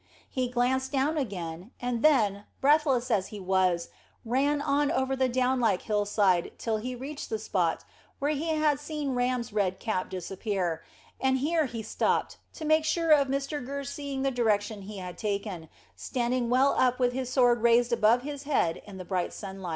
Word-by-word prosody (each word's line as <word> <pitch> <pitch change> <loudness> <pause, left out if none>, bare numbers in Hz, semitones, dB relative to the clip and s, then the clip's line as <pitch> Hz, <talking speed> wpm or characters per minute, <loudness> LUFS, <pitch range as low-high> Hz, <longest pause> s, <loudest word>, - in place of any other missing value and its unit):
He 255 -1 0
glanced 255 +2 0
down 285 +3 +1
again, 185 - -4
and 245 -2 -2
then, 210 -9 +3
breathless 275 -4 +3
as 195 -4 +2
he 210 - -8
was, 185 -2 +1 0.4
ran 275 +5 +1
on 285 0 +1
over 265 -4 0
the 260 -1 +1
down 255 +1 +1
like 215 -6 +1
hillside 205 -4 +1
till 225 -2 -1
he 250 +4 -4
reached 280 +4 -7
the 220 - -1
spot 185 -6 -1 0.3
where 285 +2 0
he 305 +2 -2
had 305 -3 +2
seen 295 -2 -3
Ram's 245 -2 -1
red 190 -3 0
cap 185 -5 -2
disappear, 185 -1 -3 0.4
and 265 0 +2
here 310 +4 +1
he 230 -2 -6
stopped, 215 - 0 0.2
to 315 - -6
make 310 +1 +4
sure 330 +1 +1
of 285 -2 +6
Mr 275 +1 -2
Gurr 280 +2 -4
seeing 280 -1 -4
the 270 - +1
direction 215 -4 0
he 205 +1 -8
had 180 -1 -7
taken, 200 -6 -3 0.3
standing 240 - -1
well 260 +3 +4
up 250 -1 +3
with 245 -1 +1
his 255 -1 -3
sword 245 -3 +4
raised 235 +1 +4
above 235 +2 +4
his 285 -1 -5
head 275 - 0
in 200 -2 -9
the 185 - -7
bright 180 -1 -1
sunshine. 190 -3 -7
245 Hz, 180 wpm, -28 LUFS, 205-275 Hz, 0.4 s, of